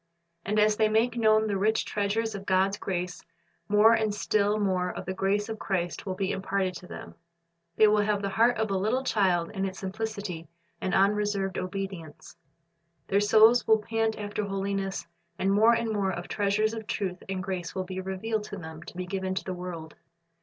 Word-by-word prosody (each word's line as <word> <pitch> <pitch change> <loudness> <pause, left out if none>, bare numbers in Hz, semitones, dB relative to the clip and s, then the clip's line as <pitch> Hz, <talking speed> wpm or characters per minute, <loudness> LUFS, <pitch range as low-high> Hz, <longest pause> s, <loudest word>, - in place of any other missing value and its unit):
And 210 +2 -1
as 210 0 +4
they 215 -1 +3
make 225 +2 +2
known 220 -2 +4
the 200 -3 -1
rich 220 +3 +2
treasures 215 +2 -1
of 195 -1 -7
God's 190 +1 +2
grace, 180 -1 -3 0.5
more 210 +2 +6
and 220 -2 +1
still 210 0 +1
more 185 -3 +1
of - - -6
the 190 - -3
grace 200 +2 0
of 220 -1 -5
Christ 180 0 -2
will 185 - -2
be 190 0 -1
imparted 190 -1 -1
to 180 - -12
them. - - -9 0.6
They 215 - +6
will 210 0 +4
have 205 -1 0
the 200 - 0
heart 230 +5 +3
of 220 -2 -1
a 195 - +1
little 230 +7 0
child 185 -8 +1
in 195 -2 -3
its 190 -1 -3
simplicity 195 -4 -5 0.3
and 185 - 0
unreserved 200 -1 +1
obedience. 185 -5 -6 0.7
Their 200 +1 +3
souls 220 +3 +5
will 220 - +6
pant 225 +1 -1
after 210 0 -3
holiness, 195 -1 -2 0.3
and 195 +1 +1
more 220 +3 +6
and 230 -1 0
more 200 -2 0
of 175 -1 -4
the - - -15
treasures 210 +2 +1
of 220 -2 -6
truth 185 -3 -3
and 190 -1 -2
grace 185 -3 -4
will 190 - -1
be 185 0 -5
revealed 210 +3 -3
to 205 - -7
them 160 -3 -9
to 175 - -11
be 185 - -3
given 190 0 -3
to - - -2
the 185 - -4
world. 175 -3 -7
200 Hz, 200 wpm, -28 LUFS, 190-215 Hz, 0.7 s, more